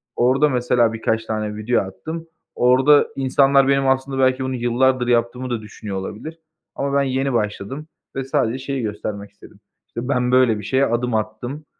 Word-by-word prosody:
Orada 135 +5 +3
mesela 125 -3 +2
birkaç 115 0 -1
tane 110 -1 -3
video 110 +3 +1
attım. 160 - -7 0.3
Orada 130 +4 +5
insanlar 135 0 +3
benim 135 0 +2
aslında 135 0 0
belki 130 0 +2
bunu 130 0 -2
yıllardır 125 +1 +1
yaptığımı 120 +1 0
da 120 -2 -2
düşünüyor 105 -2 -7
olabilir 150 +12 -7 0.4
ama 140 0 -2
ben 140 - +3
yeni 135 0 -1
başladım 115 +6 -3 0.3
ve 135 - -2
sadece 130 -2 0
şeyi 135 -1 -2
göstermek 105 -1 -5
istedim, 100 - -17 0.3
işte 120 +1 -6
ben 125 -3 +1
böyle 125 -4 +4
bir - - -8
şeye 130 +6 +2
adım 120 0 -1
attım, 110 +7 -4
125 Hz, 170 wpm, -21 LUFS, 110-135 Hz, 0.4 s, Orada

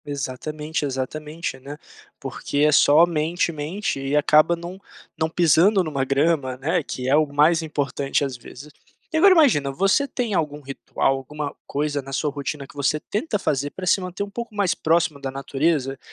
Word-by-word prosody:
Exatamente, 150 +3 -4
exatamente, 150 +4 -4
né, 140 +3 -9 0.4
porque 145 - -4
é 150 +1 +4
somente, 165 +3 +3
mente 160 +3 -3
e 135 +1 -2
acaba 155 +3 +4
não 175 +3 -9 0.3
não 160 -1 -1
pisando 175 +4 +4
em - - -4
uma 140 -3 -1
grama, 140 -1 +1
né, 165 +6 0
que 130 -3 -5
é 135 - +4
o 155 0 +3
mais 150 +4 +3
importante 145 -2 -1
às 135 -2 -5
vezes. 140 +4 -12 0.4
E - - +2
agora 385 +4 +7
imagina, 250 - +4
você 195 - +2
tem 240 -5 -3
algum 150 -4 -1
ritual, 135 0 -1
alguma 145 +2 -6
coisa 145 0 -2
na 135 0 -10
sua 150 +2 -1
rotina 140 0 -5
que - - -17
você 145 +2 0
tenta 210 - -2
fazer 145 -6 -1
para 185 - -7
se 185 - +3
manter 185 +2 -4 0.3
mais 205 -3 +1
próximo 160 -2 +1
da 135 - -3
natureza? 135 0 -1
150 Hz, 170 wpm, -23 LUFS, 140-170 Hz, 0.4 s, agora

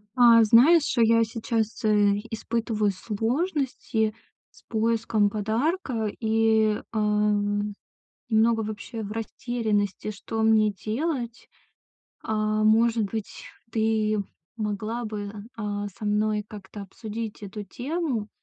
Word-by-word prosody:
А, 235 -2 +7
знаешь, 275 +8 +5
я 230 0 +5
сейчас, 225 0 -2
э, 205 -1 +3
испытываю 225 -2 -1
сложности 230 - -1 0.4
с - - -20
поиском 225 -2 +1
подарка 225 - -1
и, 220 -1 +2
э, 220 - 0 1.3
немного 225 0 +3
вообще 215 +1 -6
в 205 - -6
растерянности, 220 -3 -2
что 220 +2 -4
мне 220 -1 +4
делать. 240 - -3 0.7
Э, - - -3
может 215 +2 +3
быть, 215 +1 -6 0.3
ты 220 -1 +1 0.4
могла 215 +3 -3
бы, 205 -2 -5 0.2
э, 225 - -6 0.4
со 220 - -7
мной 210 0 +1
как-то 205 -1 -9
обсудить 215 +2 -7
эту 205 +1 -6
тему, 255 - -3
220 Hz, 105 wpm, -26 LUFS, 215-230 Hz, 1.3 s, А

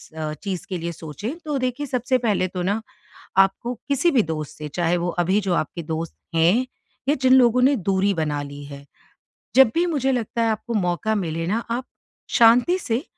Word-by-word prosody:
अ, 155 -1 -3
चीज़ 190 -4 -4
के 185 - -2
लिए 170 0 -4
सोचें, 165 - -6
तो 300 -2 -1
देखिए, 255 +2 -2
सबसे 255 -1 0
पहले 210 -6 +1
तो 180 0 -5
ना, 200 +4 0 0.6
आपको 195 +5 +3
किसी 285 +5 +2
भी 260 -7 +4
दोस्त 155 -4 -5
से, 150 0 -5
चाहे 170 +3 0
वो 175 0 -1 0.2
अभी 190 +4 +2
जो 190 -3 0
आपके 170 +1 -2
दोस्त 160 +1 -4 0.2
हैं 175 +10 +3 0.4
या 290 - +5
जिन 260 0 +5
लोगों 250 -1 +5
ने 275 +3 +5
दूरी 195 +1 +2
बना 150 -3 -1
ली 145 0 -8
है, 140 0 -10 0.7
जब 265 -3 +7
भी 340 +1 +3
मुझे 280 -6 0
लगता 235 -2 -2
है, 230 - +2
आपको 220 +2 -4
मौका 200 +1 0
मिले 165 -4 -2
ना, 215 +5 +1
आप 245 +2 -2 0.5
शांति 240 +10 +6
से, 240 -5 -2
205 Hz, 195 wpm, -23 LUFS, 165-250 Hz, 0.7 s, जब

